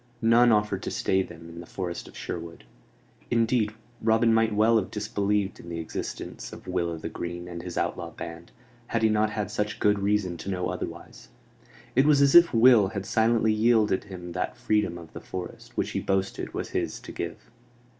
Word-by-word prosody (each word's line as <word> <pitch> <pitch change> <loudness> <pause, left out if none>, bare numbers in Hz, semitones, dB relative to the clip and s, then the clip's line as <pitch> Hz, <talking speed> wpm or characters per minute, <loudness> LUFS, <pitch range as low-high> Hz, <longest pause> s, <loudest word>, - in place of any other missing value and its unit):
None 120 +1 +5
offered 105 -3 +1
to - - -4
stay 95 - +1
them 85 -3 -9
in 85 0 -10
the 85 - -9
forest 90 -3 -5
of - - -13
Sherwood; 85 0 -6 0.7
indeed, 115 -2 +2 0.3
Robin 115 +1 +4
might 110 0 +3
well 110 +2 +4
have 95 - -4
disbelieved 105 -1 -1
in 85 - -10
the 85 - -4
existence 80 -1 -6
of - - -11
Will 90 -2 0
o' 85 - -4
th' 80 - -6
Green 85 0 -5
and 85 -1 -6
his 90 -1 -7
outlaw - - -2
band, 85 0 -9 0.4
had 115 -1 -1
he 110 - +5
not 110 0 +2
had 105 -2 -3
such 105 0 -2
good 105 -1 +3
reason 100 -3 0
to 90 - -6
know 90 -2 -1
otherwise. - - -7 0.7
It 135 +3 +5
was 150 -2 +5
as 140 -1 +5
if 175 0 +8
Will 115 -3 +6
had 100 -1 -5
silently 110 +1 +3
yielded 110 -3 +3
him 90 -3 -8
that - - -3
freedom 105 -5 0
of 85 -2 -12
the - - -8
forest 90 -1 -8
which - - 0
he - - -1
boasted 95 0 -1
was - - -3
his - - -2
to - - -10
give. - - -4
105 Hz, 195 wpm, -27 LUFS, 90-110 Hz, 0.7 s, if